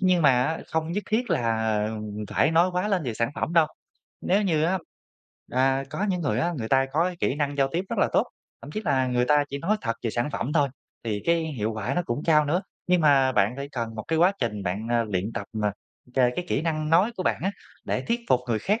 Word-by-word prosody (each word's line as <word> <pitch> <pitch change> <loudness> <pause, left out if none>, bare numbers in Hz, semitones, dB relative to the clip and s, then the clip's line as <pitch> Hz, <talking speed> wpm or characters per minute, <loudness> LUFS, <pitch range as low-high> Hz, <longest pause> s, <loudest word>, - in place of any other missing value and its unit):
nhưng 185 -3 +3
mà 140 - +7
á 160 +4 -1
không 160 +1 -1
nhất 205 - -1
thiết 240 +3 0
là 110 -2 +1 0.4
phải 145 - +2
nói 170 +3 +4
quá 180 +3 0
lên 195 -4 +1
về 120 -6 -3
sản 115 +3 0
phẩm - - -2
đâu. 165 -2 +5 0.5
Nếu 200 +3 +2
như 160 -6 +1
á 185 +3 +1 0.7
à, 135 +1 +2
có 210 - -2
những 180 -2 0
người 135 -9 0
á, 170 +8 +1
người 110 -2 -3
ta 135 0 +3
có 160 +4 +3
cái 180 -1 -2
kỹ - - +1
năng 145 -1 -2
giao 135 -1 +2
tiếp 175 +3 -1
rất - - -3
là - - +3
tốt, - - +3 0.4
thậm 140 - -9
chí 215 - -3
là 135 -5 +2
người 125 -1 +1
ta 145 +2 +3
chỉ 140 - -4
nói 195 +9 +1
thật 115 -1 -2
về 115 - -1
sản 120 +6 -1
phẩm 140 - -2
thôi 145 -3 +3 0.4
thì 105 -2 -2
cái 170 0 +3
hiệu 115 -8 -2
quả 110 +5 -3
nó 175 - +1
cũng 120 +5 -2
cao 155 -2 +5
nữa. 170 +7 0 0.2
Nhưng 180 -1 +3
mà 140 -4 +4
bạn 105 +1 +2
phải 140 0 -5
cần 115 -2 -3
một 110 - -5
cái 160 0 +1
quá 180 +3 +5
trình 105 -4 -2
bạn, 100 +5 -3
à, 120 -1 +2
luyện 105 +1 -2
tập, 100 - -4 0.2
à, 105 -1 +1 0.4
c - - -29
cái 125 +6 +2
kỹ 140 - 0
năng 155 -2 -1
nói 185 +8 +4
của 185 - -2
bạn - - 0
á, 195 - +1 0.3
để - - -2
thuyết 235 +1 +1
phục 125 -1 +4
người 115 - +1
khác, 205 - 0
145 Hz, 260 wpm, -26 LUFS, 120-170 Hz, 0.7 s, mà